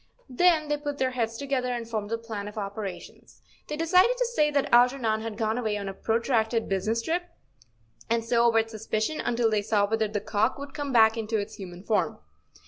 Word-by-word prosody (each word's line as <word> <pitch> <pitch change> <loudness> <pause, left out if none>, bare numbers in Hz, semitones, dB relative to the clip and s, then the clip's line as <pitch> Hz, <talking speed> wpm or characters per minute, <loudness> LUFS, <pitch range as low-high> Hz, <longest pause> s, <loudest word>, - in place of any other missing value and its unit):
Then 320 +2 +3
they 295 0 0
put 290 -1 -4
their 260 -1 0
heads 230 -2 -2
together 265 -2 -1
and 240 -2 -4
formed 215 -2 -4
a 230 - 0
plan 220 -3 -6
of 210 - -9
operations. 200 -1 -7 0.2
They 300 - -4
decided 365 +9 +4
to - - +1
say 440 -11 +2
that 285 -2 0
Alger¬ 245 +3 +5
non 220 -3 0
had 225 -1 -5
gone 220 +1 0
away 215 -3 -1
on 200 -1 -5
a 195 - -4
protracted 225 +1 0
business 215 +4 -1
trip, 345 +5 -1 0.8
and 230 0 +1
so 235 0 +4
avert 225 -1 +1
suspicion 220 +6 -2
until 235 -2 +1
they 210 -1 +2
saw 205 0 +2
whether 220 +1 0
the 210 0 -2
cock 215 +4 0
would 280 0 -8
come 290 -2 -4
back 225 -2 +5
into 220 0 -1
its 210 +1 -4
human 180 -2 -9
form. 215 0 0
230 Hz, 210 wpm, -27 LUFS, 215-270 Hz, 0.8 s, Alger¬